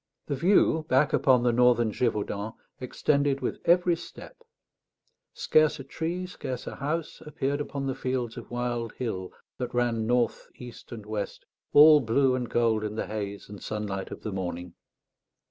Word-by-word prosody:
The 140 - -2
view, 160 0 +3
back 135 +3 +3
upon 125 -3 +4
the 120 - +3
northern 120 -2 +4
Gévaudan, 105 -2 -2 0.2
extended 140 +2 0
with - - -3
every 175 0 +4
step; 335 - -11 1.0
scarce 155 - +2
a - - -6
tree, 170 +6 -4
scarce 130 -8 -6
a - - -7
house, 155 +4 -3
appeared 145 -1 -2
upon 140 -1 -4
the 135 - -1
fields 125 -3 -3
of 120 - -9
wild 120 -2 -3
hill 95 -7 -4 0.3
that 125 -1 -4
ran 115 -2 +1
north, 120 -1 0
east, 120 -2 -11
and 110 -4 -8
west, 105 -1 -5 0.3
all 150 +1 +8
blue 130 +2 +2
and 125 -2 -2
gold 115 -2 +1
in 105 0 -4
the - - -2
haze 100 -2 -5
and 100 -1 -10
sunlight 105 -3 -4
of - - -9
the 110 - -3
morning. 90 -2 -5
125 Hz, 165 wpm, -27 LUFS, 110-140 Hz, 1.0 s, all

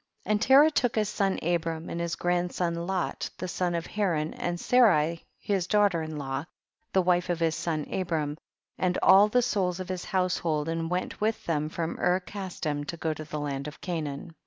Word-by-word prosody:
And 210 0 +1
Terah 275 +6 +7
took 245 -5 +1
his 215 -2 +1
son 195 -2 0
Abram 165 -1 -1
and 170 - -4
his 170 -1 -2
grandson 175 -1 -1
Lot, 190 -2 -2
the 185 - -4
son 175 -1 -1
of 170 - -2
Haran, 170 -7 -1
and 175 0 -3
Sarai 170 -11 +3
his 195 -3 -1
daughter 205 -5 +3
in 155 -1 -5
law, 135 0 -3 0.5
the 190 - +3
wife 180 0 +2
of 175 -1 0
his 165 -1 +2
son 160 -2 -2
Abram, 160 -5 -1 0.4
and 180 -1 +1
all 195 +2 +8
the 245 +3 +2
souls 190 -6 0
of 185 -1 -6
his 185 -1 -4
household 175 -5 0
and 165 0 -2
went 180 +3 -3
with 220 +1 0
them 155 -2 0
from 165 0 -3
Ur 180 +1 +3
Casdim 180 -6 -4
to 170 - -5
go 160 -1 -1
to 155 - -7
the 150 0 -5
land 140 -1 -3
of 150 - -9
Canaan. 155 -3 -4
175 Hz, 195 wpm, -28 LUFS, 160-190 Hz, 0.5 s, all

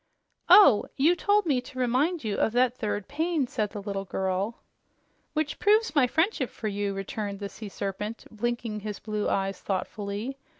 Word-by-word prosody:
"Oh! 360 - +8
You 310 +6 +4
told 410 +3 +2
me 275 -6 +2
to 255 +1 -12
remind 260 +7 +1
you 210 -2 -1
of 220 - +1
that 250 0 +3
third 210 -4 -3
pain," 315 0 0
said 215 -4 -2
the 205 - -7
little 200 -1 -3
girl. 190 +4 -2 0.7
"Which 310 -1 -2
proves 430 +2 +3
my 280 -5 +4
friendship 320 - +1
for 220 - -5
you," 200 -1 -2
returned 200 +1 -4
the 200 0 -5
Sea 215 0 -9
Serpent, 200 +3 -5
blinking 230 -1 -2
his 210 0 -5
blue 210 -1 -2
eyes 195 -1 -1
thoughtfully. 205 +6 -3
225 Hz, 170 wpm, -27 LUFS, 205-285 Hz, 0.7 s, Oh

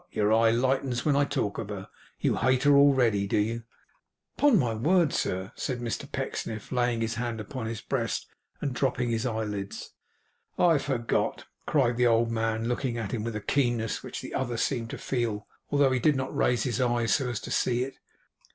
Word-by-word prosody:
your 105 +1 +1
eye 115 0 +5
lightens 125 +1 +1
when 150 -2 +3
I 140 0 +4
talk 100 -7 -2
of 105 -3 -5
her! 100 -2 -6 0.3
You - - +1
hate 130 0 +2
her 145 0 +6
already, 125 -8 +4
do - - 0
you?' 115 +2 -1 0.7
'Upon 290 -6 +5
my 120 -9 +1
word, 160 +8 +2
sir!' 95 +1 -1
said 130 -3 -3
Mr 120 -2 -4
Pecksniff, 110 -2 -4
laying 120 -2 +1
his 115 0 -1
hand 120 -2 -3
upon 115 +2 -5
his 110 -1 -4
breast, - - -2 0.4
and 140 - -1
dropping 125 -1 0
his 115 +2 0
eyelids. 105 -4 -4 0.7
'I 165 -4 +4
forgot,' 125 -5 -1 0.2
cried 125 -5 +2
the 125 0 +4
old 115 0 +3
man, 115 0 -1
looking 125 0 -1
at 110 -3 -3
him 110 -3 -2
with 115 -1 -3
a 105 - -3
keenness 120 -3 0
which - - -6
the - - -8
other 120 -3 -1
seemed 115 -1 -1
to - - -5
feel, 115 -5 -2 0.2
although 140 -2 +3
he 130 - +1
did 150 +4 +3
not 130 0 -3
raise 120 -2 +2
his 130 +1 -1
eyes 120 -2 +2
so 130 -3 +1
as 120 -4 -2
to - - -7
see 125 0 +1
it. 135 +1 -8
120 Hz, 195 wpm, -28 LUFS, 115-130 Hz, 0.7 s, her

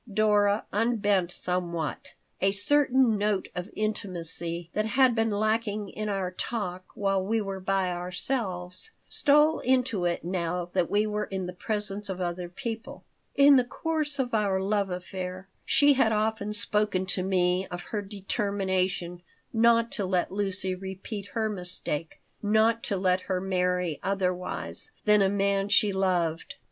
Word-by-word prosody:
Dora 205 0 +3
unbent 205 -5 +1
somewhat. 175 -1 -3 0.3
A 195 0 +3
certain 255 +1 +3
note 205 -2 0
of 180 +2 -5
intimacy 170 -5 -2
that 215 +1 0
had 255 +2 +4
been 225 0 +1
lacking 215 0 0
in 215 0 -4
our 195 -3 -1
talk 185 -2 -3
while 195 -1 +1
we 225 +4 0
were 195 -2 -4
by 190 -1 0
ourselves 180 - -1 0.2
stole 300 +2 +4
into 250 -7 +1
it 175 0 -1
now 175 0 -2
that 180 -3 +1
we 210 +1 +2
were 210 0 -2
in 190 -1 -4
the 180 - -5
presence 205 +1 -3
of 190 -1 -4
other 175 0 -3
people 225 +3 -6 0.3
In 280 0 +7
the 250 - +4
course 305 +3 -2
of 250 -3 -1
our 200 -3 +2
love 200 0 0
affair 185 +1 -5 0.2
she 290 -1 +5
had 250 -4 +3
often 215 -1 0
spoken 210 -2 0
to 185 0 0
me 185 0 +1
of 175 0 -6
her 210 - 0
determination 195 -3 -2 0.3
not 230 0 +4
to 200 - -1
let 185 -1 0
Lucy 195 -1 -1
repeat 190 +2 -6
her 220 -1 +1
mistake, 180 -5 -2 0.2
not 220 +2 +3
to 200 - 0
let 185 0 +2
her 185 -1 +1
marry 180 -3 0
otherwise 185 - -2 0.2
than 210 -1 +5
a 195 - +4
man 200 0 +1
she 210 -1 +4
loved. 175 -4 0
195 Hz, 150 wpm, -27 LUFS, 180-215 Hz, 0.3 s, In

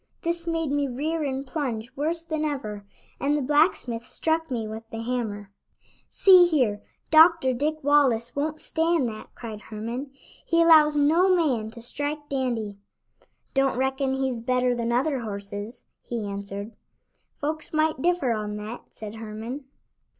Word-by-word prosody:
This 335 0 -2
made 325 -3 -1
me 285 -1 +1
rear 305 +6 -2
and 270 -1 -2
plunge 255 -5 -4
worse 325 +4 -1
than 315 -2 -2
ever, 250 -9 -3 0.4
and 290 +2 +1
the - - -1
blacksmith 280 -5 +2
struck 320 0 0
me 230 -4 -2
with 220 +1 -6
the 225 -1 -5
hammer. 220 -5 -3 0.6
"See 365 -2 +7
here, 250 -11 +1 0.3
Dr. 315 -4 +6
Dick 305 +4 -2
Wallace 270 -5 +3
won't 305 +2 -1
stand 325 -4 +1
that," 215 -1 -8
cried 220 -3 -7
Herman. 230 +6 -5 0.3
"He 335 - +1
allows 305 -2 +6
no 325 +6 +4
man 255 -11 +1
to 230 +1 -11
strike 290 +4 -4
Dandy." 235 -7 -2 0.7
"Don't 270 -2 +2
reckon 265 +1 0
he's 265 -3 -1
better 250 +1 +1
than 235 -1 -1
other 265 +3 +1
horses," 205 +1 -5 0.2
he 235 -3 -4
answered. 200 +1 -5 0.7
"Folks 310 +2 -3
might 310 -3 +1
differ 345 -7 +2
on 210 -2 -2
that," 215 +3 -6
said 215 0 -8
Herman. 225 +5 -6
265 Hz, 150 wpm, -26 LUFS, 225-310 Hz, 0.7 s, See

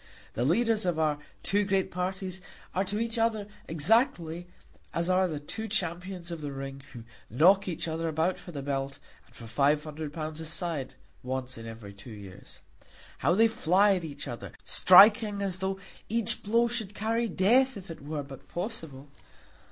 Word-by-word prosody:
The 120 - -1
leaders 220 - +2
of 175 -3 0
our 155 -2 +1 0.2
two 205 +1 +2
great 195 -1 0
parties 185 +1 -3 0.3
are 190 - +1
to 205 +2 -2
each 230 0 -2
other 225 -2 +1 0.2
exactly 170 - +1 0.5
as 170 +2 +1
are 185 0 +3
the 155 -4 -4
two 220 +9 -6
champions 180 -3 -3
of 165 -2 -5
the 145 -1 -4
ring 135 0 -6
who 120 - -9 0.3
knock 185 - +5
each 170 -1 -3
other 165 +1 -2
about 160 +3 0
for 175 - -10
the 140 -4 -6
belt 135 0 -3 0.3
and - - -23
for 115 - -10
five 140 +6 +2
hundred 155 -1 -6
pounds 155 0 -5
a 160 - -6
side 155 -5 -2 0.3
once 130 0 -4
in 115 0 -9
every 110 -3 -9
two 100 +4 -12
years. 100 -4 -11 0.6
How 175 - +2
they 225 +3 +6
fly 205 -2 +3
at 180 -3 -2
each 145 -2 -6
other, 120 - -7
striking 205 +2 +7
as 185 -2 -2
though 190 0 -2 0.3
each 230 -1 +3
blow 230 +3 +2
should 220 -4 -3
carry 225 +2 0
death 240 +7 +3
if 190 -3 -9
it 165 - -9
were 145 0 -4
but 135 -1 -12
possible! 165 - -5
175 Hz, 180 wpm, -29 LUFS, 145-205 Hz, 0.6 s, striking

